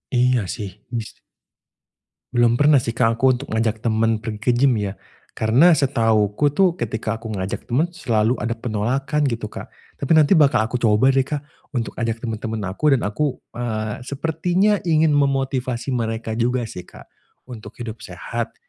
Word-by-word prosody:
Iya 125 0 +3
sih, 105 -4 -5 0.3
bis 110 - -7 1.2
Belum 120 -1 +4
pernah 145 +2 +5
sih 115 -1 -4
Kak, 115 -1 +1
aku 130 -1 +4
untuk 140 +3 -8
ngajak 110 0 -1
temen 115 0 +2
pergi 110 -2 -5
ke 125 +3 +1
gym 125 -2 +3
ya. 100 -1 -3 0.4
Karena 135 +11 +5
setahuku 115 -3 +2
tuh, 185 -1 +3
ketika 110 -1 -3
aku 115 - -8
ngajak 95 -3 -4
temen, 155 +9 +1
selalu 120 -8 0
ada 115 -1 -2
penolakan 125 +7 -1
gitu 115 -4 -3
Kak. - - -8 0.3
Tapi 140 - -3
nanti 155 -2 +4
bakal 140 - +5
aku 120 +3 -3
coba 115 +3 +4
deh 135 0 +1
Kak, 150 -1 -3 0.3
untuk 115 -2 -1
ajak 115 -1 -2
temen-temen 110 -2 -4
aku 145 +8 +3
dan 125 - -2
aku, 135 +7 -1 0.2
eee, 110 -3 -3
sepertinya 175 +8 +1
ingin 160 -1 +3
memotivasi 135 -3 0
mereka 115 -2 -2
juga 125 +1 +1
sih 90 -5 -8
Kak, - - -13 0.5
untuk 115 -2 -10
hidup 115 -2 -6
sehat, 110 +3 -5
120 Hz, 165 wpm, -21 LUFS, 110-140 Hz, 1.2 s, pernah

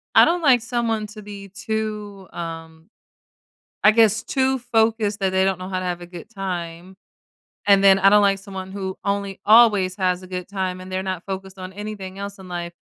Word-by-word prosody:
I - - +9
don't 345 +1 +1
like 255 -5 +5
someone 230 -3 -1
to 215 +1 -11
be 200 -1 -9
too, 210 -1 -5
um 165 0 -8 1.0
I 215 - +9
guess 220 -1 +4
too 265 0 +1
focused 225 -3 +1
that 190 -1 +1
they 190 0 +3
don't 190 -1 0
know 185 0 -7
how 185 -1 -2
to - - -5
have 175 -1 -3
a - - -8
good 175 -1 -10
time. 180 -3 -6 0.7
And 200 -1 +6
then 195 -1 +7
I 195 +1 +6
don't 210 +1 +6
like 195 -1 +3
someone 190 -1 -8
who 190 -1 -5
only 200 -1 -2
always 210 -4 +5
has 185 -1 0
a - - -10
good 180 -1 -5
time, 185 -2 -3
and 185 0 -10
they're 185 0 -2
not 185 -2 -4
focused 190 0 -6
on 185 0 -7
anything 200 -2 -7
else 200 0 -7
in 190 - -11
life. 175 -1 -5
195 Hz, 205 wpm, -22 LUFS, 185-210 Hz, 1.0 s, I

